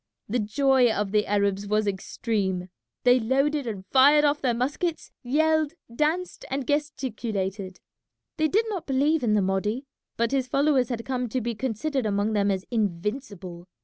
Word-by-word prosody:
The 245 +4 0
joy 250 +3 +3
of 205 -2 -1
the 210 0 +2
Arabs 200 0 0
was 215 +1 +1
extreme. 190 -2 -2 0.3
They 250 0 +5
loaded 275 +4 +1
and 200 -4 -5
fired 290 +3 +6
off 290 0 +1
their 245 -3 +1
muskets, 295 +7 -2
yelled, 315 +4 +1 0.2
danced, 325 +6 -1
and 270 0 -2
gesticulated. 215 -10 -2 0.6
They 310 -1 +3
did 430 +8 +2
not 380 -6 -4
believe 290 +3 +2
in 220 -3 +2
the 205 - +3
Mahdi, 210 +7 -1 0.3
but 230 0 +1
his 265 -2 0
followers 275 -2 +2
had 230 -2 -4
come 250 -2 -2
to 255 - -1
be 235 0 -2
considered 260 +3 -2
among 205 +1 0
them 205 -1 +2
as 190 -1 -1
invincible. 200 -3 -3
245 Hz, 160 wpm, -26 LUFS, 205-280 Hz, 0.6 s, fired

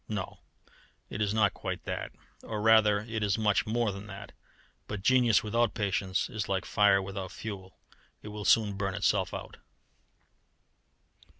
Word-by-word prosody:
No, 105 -4 -4 0.7
it 105 - -4
is 105 -2 +1
not 105 -1 +2
quite - - -5
that, - - -4 0.3
or, 110 - -5
rather, 110 -1 +5
it 110 0 -4
is 105 0 +1
much 105 -2 +1
more 115 -1 +1
than 100 +2 -8
that; 100 0 -9 0.6
but 105 -2 -5
genius 125 -2 +4
without 115 +1 +1
patience 100 -3 -1
is 110 -6 -4
like 95 0 -1
fire 100 -2 +4
without 95 -1 -6
fuel 95 -4 -8 0.5
it 105 - -7
will 105 0 -6
soon 110 -3 +4
burn 100 -1 -3
itself 100 -2 +1
out. - - -7
105 Hz, 155 wpm, -29 LUFS, 100-110 Hz, 0.7 s, rather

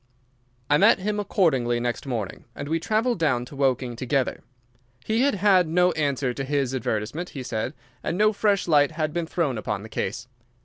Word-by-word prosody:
I 145 +2 +4
met - - +6
him 210 +2 -2
accordingly 135 - +1
next 120 +3 -3
morning 115 -7 -4
and 140 - -6
we 165 +2 0
travelled 220 +4 0
down 125 -7 +1
to 140 - -12
Woking 130 -3 0
together. 130 +2 -1 0.6
He 220 +2 +1
had 280 -4 +3
had 190 -3 +4
no 180 +3 +3
answer 140 -5 -1
to 135 - -4
his 135 -2 -1
advertisement, 125 +7 -2
he 130 - -4
said, 125 +4 -3 0.3
and 175 - -2
no 215 +1 +4
fresh 205 -2 +1
light 145 -2 +4
had 155 -1 -2
been 170 -1 -2
thrown 150 -9 -1
upon 105 -1 -3
the 110 - -10
case. 110 +4 -3
145 Hz, 185 wpm, -25 LUFS, 125-180 Hz, 0.6 s, met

